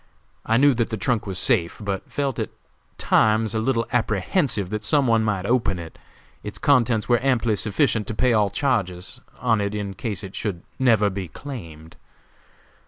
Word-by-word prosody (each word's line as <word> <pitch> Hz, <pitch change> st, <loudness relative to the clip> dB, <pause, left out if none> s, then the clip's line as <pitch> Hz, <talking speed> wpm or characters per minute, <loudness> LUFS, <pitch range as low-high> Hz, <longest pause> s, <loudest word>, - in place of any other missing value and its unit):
I 115 Hz, -, +3 dB
knew 140 Hz, +2 st, +5 dB
that 115 Hz, -1 st, -1 dB
the 110 Hz, -, -3 dB
trunk 110 Hz, +2 st, -1 dB
was 95 Hz, -2 st, -3 dB
safe, 100 Hz, -8 st, +1 dB
but 100 Hz, -3 st, -4 dB
felt 140 Hz, -3 st, -2 dB
at -, -, -2 dB, 0.5 s
times 110 Hz, 0 st, +2 dB
a 110 Hz, -, 0 dB
little 115 Hz, 0 st, 0 dB
apprehensive 110 Hz, -, 0 dB
that 105 Hz, 0 st, -3 dB
some 145 Hz, +4 st, +3 dB
one 115 Hz, -2 st, +3 dB
might 100 Hz, -3 st, -1 dB
open 115 Hz, -4 st, +1 dB
it. 85 Hz, -2 st, -9 dB, 0.4 s
Its 105 Hz, -, -7 dB
contents 120 Hz, -7 st, +2 dB
were 120 Hz, -2 st, +3 dB
amply 120 Hz, -5 st, +2 dB
sufficient 110 Hz, +1 st, +1 dB
to 110 Hz, -, -4 dB
pay 125 Hz, +1 st, +2 dB
all 105 Hz, -2 st, +3 dB
charges 95 Hz, -10 st, -2 dB, 0.2 s
on 115 Hz, -4 st, +2 dB
it 100 Hz, +1 st, -2 dB
in 100 Hz, -2 st, -4 dB
case 105 Hz, 0 st, -4 dB
it 95 Hz, -1 st, -8 dB
should 90 Hz, -5 st, -4 dB, 0.2 s
never 110 Hz, -6 st, +3 dB
be 95 Hz, -1 st, -5 dB
claimed. 80 Hz, -, -10 dB
110 Hz, 175 wpm, -23 LUFS, 100-125 Hz, 0.5 s, knew